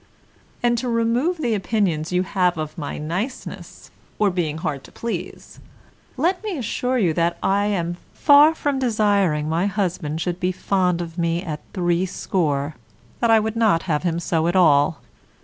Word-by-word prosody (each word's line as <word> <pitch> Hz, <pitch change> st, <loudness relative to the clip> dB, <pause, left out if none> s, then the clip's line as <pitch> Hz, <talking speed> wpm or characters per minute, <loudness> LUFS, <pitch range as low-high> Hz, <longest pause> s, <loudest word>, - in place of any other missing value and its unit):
And 240 Hz, -1 st, +2 dB
to 250 Hz, -, -3 dB
remove 235 Hz, +9 st, +1 dB
the 245 Hz, -7 st, 0 dB
opinions 190 Hz, -6 st, 0 dB
you 180 Hz, 0 st, +2 dB
have 180 Hz, -2 st, +1 dB
of 155 Hz, -1 st, -4 dB
my 150 Hz, -5 st, -5 dB
niceness, 180 Hz, -, -5 dB, 0.3 s
or 210 Hz, -2 st, +2 dB
being 165 Hz, -4 st, -2 dB
hard 145 Hz, -4 st, -3 dB
to -, -, -15 dB
please, 230 Hz, 0 st, -6 dB, 0.6 s
let 355 Hz, +8 st, 0 dB
me 410 Hz, -6 st, -3 dB
assure 250 Hz, +1 st, -1 dB
you 180 Hz, -9 st, +2 dB, 0.3 s
I 200 Hz, +1 st, +2 dB
am 175 Hz, -4 st, -1 dB
far 295 Hz, +2 st, +6 dB
from 285 Hz, -3 st, -1 dB
desiring 205 Hz, -, +1 dB
my 165 Hz, +5 st, +1 dB
husband 175 Hz, -6 st, -2 dB
should 175 Hz, +1 st, -2 dB
be 180 Hz, 0 st, 0 dB
fond 180 Hz, -2 st, 0 dB
of 170 Hz, 0 st, -7 dB
me 170 Hz, +1 st, 0 dB
at 155 Hz, -5 st, -4 dB
threescore, 175 Hz, -4 st, 0 dB, 0.5 s
that 235 Hz, -, +2 dB
I 225 Hz, -1 st, +6 dB
would 220 Hz, +1 st, -2 dB
not 215 Hz, -8 st, +3 dB
have 155 Hz, -5 st, 0 dB
him 170 Hz, -2 st, -1 dB
so 165 Hz, -1 st, 0 dB
at 175 Hz, -, 0 dB
all. 155 Hz, -3 st, +4 dB
185 Hz, 165 wpm, -22 LUFS, 165-225 Hz, 0.6 s, far